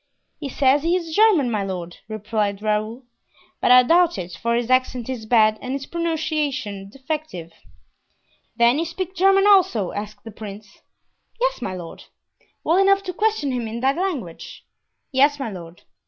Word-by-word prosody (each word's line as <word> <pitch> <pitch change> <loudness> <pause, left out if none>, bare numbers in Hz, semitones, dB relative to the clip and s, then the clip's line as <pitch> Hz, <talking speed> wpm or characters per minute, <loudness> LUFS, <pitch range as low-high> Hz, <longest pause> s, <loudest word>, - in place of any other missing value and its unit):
"He 285 - -5
says 270 +2 +3
he 335 +3 +1
is 330 -3 -3
German, 390 - +4
my 210 -2 -1
lord," 180 -3 -6
replied 215 -1 -2
Raoul; 215 +4 -1 0.6
"but - - +2
I 250 0 +8
doubt 345 +5 +3
it, 180 0 -6
for 235 +7 -1
his 240 +1 -1
accent 255 -2 +1
is 235 -4 -5
bad 215 -2 +4
and 255 0 -4
his 275 -1 -4
pronunciation 300 - -2
defective." 265 - -6 1.0
"Then 235 +4 +3
you 330 - 0
speak 360 +2 -5
German, 390 +2 +4
also?" 370 - +4
asked 205 0 -7
the 225 - -9
prince. 210 -1 -11 0.6
"Yes, - - 0
my 185 - -4
lord." 175 -2 -9 0.6
"Well 335 +4 +3
enough 395 0 +4
to 365 -2 -5
question 420 -8 0
him 245 -3 -3
in 225 +2 -5
that 270 +2 +2
language?" 315 - -5 0.5
"Yes, 285 +2 +3
my 270 -6 -4
lord." 170 -2 -11
255 Hz, 165 wpm, -22 LUFS, 215-330 Hz, 1.0 s, I